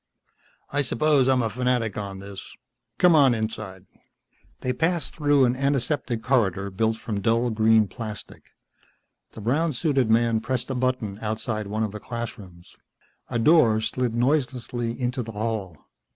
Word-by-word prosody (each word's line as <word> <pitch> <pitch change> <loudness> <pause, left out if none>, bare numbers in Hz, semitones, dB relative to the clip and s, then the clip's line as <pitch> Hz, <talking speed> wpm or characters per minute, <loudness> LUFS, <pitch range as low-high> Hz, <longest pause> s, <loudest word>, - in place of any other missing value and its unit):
"I 145 - +1
suppose 140 0 +2
I'm 130 -2 +3
a 115 - 0
fanatic 125 -3 0
on 100 -2 -5
this. 100 0 -10 0.4
Come 180 -2 +5
on 140 -6 +5
inside." 110 -4 -5 0.8
They 125 - -1
passed 165 +5 -1
through 145 -3 +3
an 120 0 +1
antiseptic 135 -3 -1
corridor 100 -7 +1
built 110 +3 0
from 105 -2 -4
dull 115 +3 +1
green 110 -1 +4
plastic. 105 +1 -8 0.8
The 110 - -9
brown 150 +9 +1
suited 135 -3 +1
man 115 0 +3
pressed 125 +3 -3
a - - 0
button 125 -5 -1
outside 110 -1 -3
one 110 +2 -2
of 110 - -2
the 105 - -7
classrooms. 105 -7 -8 0.5
A 120 - -1
door 115 -4 +5
slid 120 +1 -1
noiselessly 120 -2 -1
into 125 0 -1
the 115 -1 -7
hall. 105 -5 -3
115 Hz, 150 wpm, -25 LUFS, 110-130 Hz, 0.8 s, Come